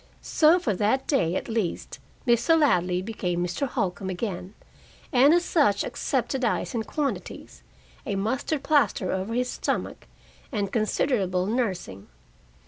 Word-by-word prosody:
So 320 Hz, +2 st, +4 dB
for 250 Hz, -, -1 dB
that 220 Hz, +7 st, +1 dB
day, 180 Hz, -, +1 dB
at -, -, -3 dB
least, 220 Hz, -7 st, -3 dB, 0.3 s
Mr. 240 Hz, +7 st, +4 dB
Ladley 180 Hz, -, +2 dB
became 180 Hz, -5 st, -2 dB
Mr. 180 Hz, +11 st, -2 dB
Holcombe 195 Hz, -6 st, -2 dB
again, 185 Hz, 0 st, -4 dB, 0.6 s
and 265 Hz, +3 st, +6 dB
as 350 Hz, +1 st, +3 dB
such 210 Hz, -, +2 dB
accepted 260 Hz, 0 st, -2 dB
ice 235 Hz, -, 0 dB
in 230 Hz, -, -1 dB
quantities, 285 Hz, +4 st, -4 dB, 0.4 s
a 200 Hz, -, -3 dB
mustard 260 Hz, +8 st, -1 dB
plaster 245 Hz, -11 st, +2 dB
over 190 Hz, +5 st, -2 dB
his 250 Hz, 0 st, 0 dB
stomach, -, -, -3 dB, 0.4 s
and 200 Hz, -5 st, -2 dB
considerable 210 Hz, -5 st, 0 dB
nursing. 190 Hz, -, -2 dB
225 Hz, 135 wpm, -26 LUFS, 185-265 Hz, 0.6 s, and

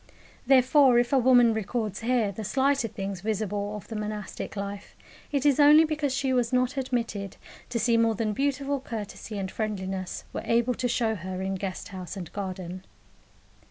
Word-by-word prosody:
Therefore, 260 Hz, 0 st, +6 dB
if 240 Hz, +2 st, +2 dB
a 270 Hz, -, +5 dB
woman 245 Hz, -2 st, +5 dB
records 220 Hz, -1 st, -2 dB
here 230 Hz, -3 st, +1 dB
the 215 Hz, +3 st, -6 dB
slighter 270 Hz, +3 st, +1 dB
things 195 Hz, -2 st, -5 dB
visible 205 Hz, -1 st, -2 dB
of 210 Hz, -, -9 dB
the 225 Hz, -, -6 dB
monastic 210 Hz, 0 st, -5 dB
life, 200 Hz, 0 st, -6 dB, 0.4 s
it 280 Hz, -1 st, 0 dB
is 285 Hz, -1 st, +4 dB
only 300 Hz, +2 st, +8 dB
because 305 Hz, -3 st, -1 dB
she 265 Hz, 0 st, 0 dB
was 245 Hz, -2 st, +1 dB
not 255 Hz, +1 st, +1 dB
admitted 230 Hz, -7 st, -3 dB, 0.3 s
to 245 Hz, -, -2 dB
see 235 Hz, +1 st, +2 dB
more 230 Hz, -1 st, +3 dB
than 215 Hz, 0 st, -1 dB
beautiful 280 Hz, +2 st, -1 dB
courtesy 220 Hz, -3 st, -6 dB
and 190 Hz, -2 st, -3 dB
friendliness 190 Hz, -4 st, -4 dB
were -, -, -3 dB
able 235 Hz, +2 st, +2 dB
to 245 Hz, +1 st, -1 dB
show 235 Hz, -2 st, +1 dB
her 185 Hz, -1 st, -5 dB
in 190 Hz, 0 st, -2 dB
guest 190 Hz, -1 st, -5 dB
house 185 Hz, 0 st, -7 dB
and 175 Hz, -4 st, -7 dB
garden. 185 Hz, -2 st, -5 dB
225 Hz, 175 wpm, -27 LUFS, 200-255 Hz, 0.4 s, only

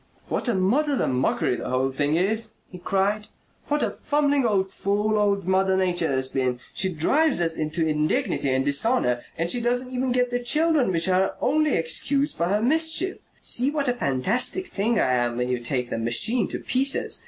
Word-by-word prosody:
"What -, -, -2 dB
a 235 Hz, -, +1 dB
muddle 265 Hz, +10 st, +1 dB
and -, -, -1 dB
mockery 125 Hz, -1 st, 0 dB
the -, -, -6 dB
whole 130 Hz, +1 st, 0 dB
thing 145 Hz, +3 st, 0 dB
is!" 220 Hz, +5 st, 0 dB, 0.2 s
he 180 Hz, -, -10 dB
cried. 200 Hz, +3 st, -1 dB, 0.4 s
"What 295 Hz, 0 st, 0 dB
a -, -, 0 dB
fumbling 285 Hz, -3 st, 0 dB
old 195 Hz, -3 st, 0 dB
fool 205 Hz, +3 st, -1 dB
old 200 Hz, -3 st, +1 dB
Mother 190 Hz, 0 st, +2 dB
Nature 175 Hz, -4 st, 0 dB
has 130 Hz, -1 st, -1 dB
been! 130 Hz, -2 st, -2 dB
She 190 Hz, 0 st, +1 dB
drives 275 Hz, -, +1 dB
us 165 Hz, -1 st, 0 dB
into 155 Hz, +1 st, -1 dB
indignity 150 Hz, -2 st, 0 dB
and 130 Hz, +1 st, 0 dB
dishonour: 140 Hz, -, +1 dB, 0.2 s
and 170 Hz, +1 st, 0 dB
she 245 Hz, -, 0 dB
doesn't 245 Hz, +2 st, 0 dB
even 255 Hz, 0 st, -1 dB
get 250 Hz, 0 st, +1 dB
the 245 Hz, -, 0 dB
children 300 Hz, -, +2 dB
which 165 Hz, 0 st, +1 dB
are 185 Hz, 0 st, +3 dB
her 190 Hz, -, -1 dB
only 305 Hz, +2 st, +1 dB
excuse 275 Hz, -, 0 dB
for 170 Hz, -, -1 dB
her 205 Hz, +4 st, 0 dB
mischief. 320 Hz, +7 st, +1 dB, 0.2 s
See 250 Hz, +3 st, +2 dB
what 285 Hz, -3 st, -1 dB
a -, -, +2 dB
fantastic 225 Hz, -, 0 dB
thing 220 Hz, -, -1 dB
I 130 Hz, -, +2 dB
am 120 Hz, -1 st, 0 dB
when 125 Hz, 0 st, -1 dB
you 125 Hz, -1 st, -1 dB
take 125 Hz, 0 st, -3 dB
the -, -, -2 dB
machine 190 Hz, -, +2 dB
to -, -, -5 dB
pieces! 270 Hz, +2 st, -1 dB
195 Hz, 200 wpm, -24 LUFS, 155-250 Hz, 0.4 s, are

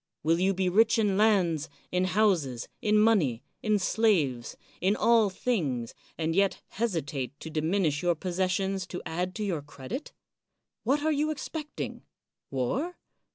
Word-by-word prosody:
Will 165 Hz, +2 st, +3 dB
you 190 Hz, +1 st, +2 dB
be 190 Hz, 0 st, +1 dB
rich 220 Hz, +6 st, +4 dB
in 205 Hz, -3 st, +2 dB
lands, 190 Hz, -8 st, +2 dB, 0.2 s
in 180 Hz, 0 st, +2 dB
houses, 180 Hz, -, +1 dB
in 215 Hz, 0 st, +3 dB
money, 195 Hz, -, +3 dB, 0.2 s
in 215 Hz, -1 st, +2 dB
slaves, 175 Hz, -, +1 dB, 0.2 s
in 190 Hz, +4 st, +3 dB
all 230 Hz, -3 st, +4 dB
things, 150 Hz, -, -1 dB, 0.2 s
and 160 Hz, 0 st, -1 dB
yet 195 Hz, 0 st, +2 dB
hesitate 150 Hz, -, -3 dB
to 160 Hz, -, -7 dB
diminish 160 Hz, -1 st, +1 dB
your 175 Hz, -1 st, +2 dB
possessions 185 Hz, +2 st, -1 dB
to 180 Hz, -, -6 dB
add 180 Hz, +3 st, -2 dB
to 215 Hz, -, -3 dB
your 180 Hz, -7 st, -1 dB
credit? 145 Hz, -, -7 dB, 0.7 s
What 280 Hz, +5 st, +1 dB
are 315 Hz, -, +2 dB
you 300 Hz, +1 st, +1 dB
expecting? 305 Hz, 0 st, -5 dB, 0.5 s
War? 255 Hz, -, -2 dB
185 Hz, 145 wpm, -28 LUFS, 160-215 Hz, 0.7 s, rich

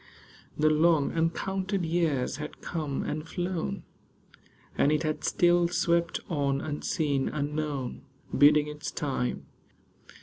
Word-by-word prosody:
The 155 Hz, +1 st, +4 dB
long, 155 Hz, -1 st, +3 dB
uncounted 190 Hz, +3 st, -1 dB
years 160 Hz, -7 st, 0 dB
had 150 Hz, 0 st, -7 dB
come 150 Hz, -5 st, -3 dB
and 155 Hz, +2 st, -4 dB
flown, 175 Hz, -2 st, -3 dB, 0.9 s
And 145 Hz, -, +3 dB
it 155 Hz, +1 st, +1 dB
had 155 Hz, -1 st, -2 dB
still 175 Hz, 0 st, +3 dB
swept 170 Hz, -1 st, +1 dB
on, 140 Hz, -6 st, 0 dB
unseen, 145 Hz, -2 st, -1 dB
unknown, 145 Hz, -3 st, -3 dB, 0.3 s
Biding 150 Hz, +1 st, +6 dB
its 150 Hz, 0 st, -5 dB
time. 135 Hz, -4 st, -2 dB
155 Hz, 110 wpm, -28 LUFS, 145-170 Hz, 0.9 s, Biding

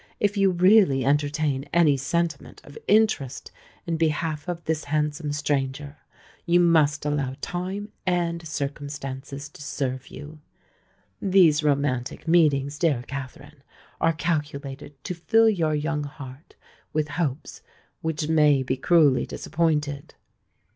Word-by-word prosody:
If 205 Hz, 0 st, +1 dB
you 195 Hz, -1 st, +4 dB
really 180 Hz, -, +4 dB
entertain 145 Hz, -1 st, 0 dB
any 160 Hz, -4 st, +4 dB
sentiment 160 Hz, +3 st, -2 dB
of 145 Hz, -, -14 dB
interest 210 Hz, -, +1 dB, 0.3 s
in 165 Hz, -1 st, -1 dB
behalf 155 Hz, 0 st, -1 dB
of 175 Hz, -1 st, -4 dB
this 160 Hz, -1 st, -2 dB
handsome 150 Hz, 0 st, -1 dB
stranger, 145 Hz, 0 st, -2 dB, 0.5 s
you 175 Hz, 0 st, +3 dB
must 155 Hz, -4 st, +3 dB
allow 140 Hz, -3 st, -1 dB
time 190 Hz, +4 st, -4 dB
and 170 Hz, -2 st, -1 dB
circumstances 140 Hz, -1 st, -5 dB
to 155 Hz, +1 st, -15 dB
serve 130 Hz, -2 st, -3 dB
you. 150 Hz, +1 st, -10 dB, 0.8 s
These 175 Hz, -6 st, +4 dB
romantic 140 Hz, -2 st, -1 dB
meetings, 150 Hz, -4 st, +3 dB
dear 145 Hz, -8 st, +1 dB
Katherine, 140 Hz, +2 st, -8 dB, 0.4 s
are 165 Hz, 0 st, +2 dB
calculated 145 Hz, -3 st, -3 dB
to -, -, -3 dB
fill 225 Hz, +6 st, +3 dB
your 165 Hz, -8 st, +1 dB
young 150 Hz, 0 st, -2 dB
heart 140 Hz, 0 st, -11 dB, 0.4 s
with 150 Hz, -1 st, 0 dB
hopes 145 Hz, -2 st, -3 dB, 0.4 s
which 160 Hz, -1 st, -2 dB
may 150 Hz, -4 st, +4 dB
be 130 Hz, +1 st, -2 dB
cruelly 150 Hz, -2 st, +3 dB
disappointed. 150 Hz, -4 st, -2 dB
150 Hz, 120 wpm, -25 LUFS, 140-170 Hz, 0.8 s, you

